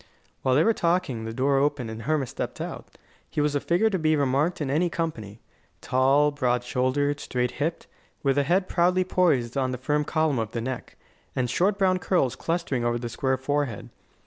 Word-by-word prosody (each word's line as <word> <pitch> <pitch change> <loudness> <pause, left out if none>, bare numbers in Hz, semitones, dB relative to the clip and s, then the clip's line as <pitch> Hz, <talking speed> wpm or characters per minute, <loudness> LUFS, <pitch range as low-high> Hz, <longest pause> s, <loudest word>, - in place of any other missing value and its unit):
While 130 -1 +2
they 150 - +5
were 225 - +4
talking 170 - 0
the 115 - -4
door 135 +4 +1
opened 140 -5 0
and 110 +1 -7
Hermas 140 +1 -1
stepped - - -5
out. - - -6 0.4
He - - -3
was 150 0 +2
a 145 - +1
figure 180 +9 +2
to 190 - 0
be 155 -1 +3
remarked 145 +4 +1
in 140 -4 -2
any 170 +5 +2
company 115 -12 -4 0.4
tall, 135 +3 +3
broad 125 -4 0
shouldered, 145 +4 0
straight 125 -3 -1
hipped, 165 +3 -1 0.4
with 140 0 +2
a - - +3
head 185 +6 +1
proudly 180 +1 +2
poised 145 -10 +1
on 130 -2 +1
the 125 - -3
firm 150 +4 0
column 155 -4 +1
of 110 -1 -3
the 115 - -2
neck, 130 +2 -5 0.4
and 125 -2 0
short 195 +7 +2
brown 185 -2 +2
curls 175 -9 +1
clustering 165 -7 -2
over 120 0 +1
the 120 0 -5
square 130 +3 0
forehead. 140 -4 -2
145 Hz, 200 wpm, -26 LUFS, 125-165 Hz, 0.4 s, they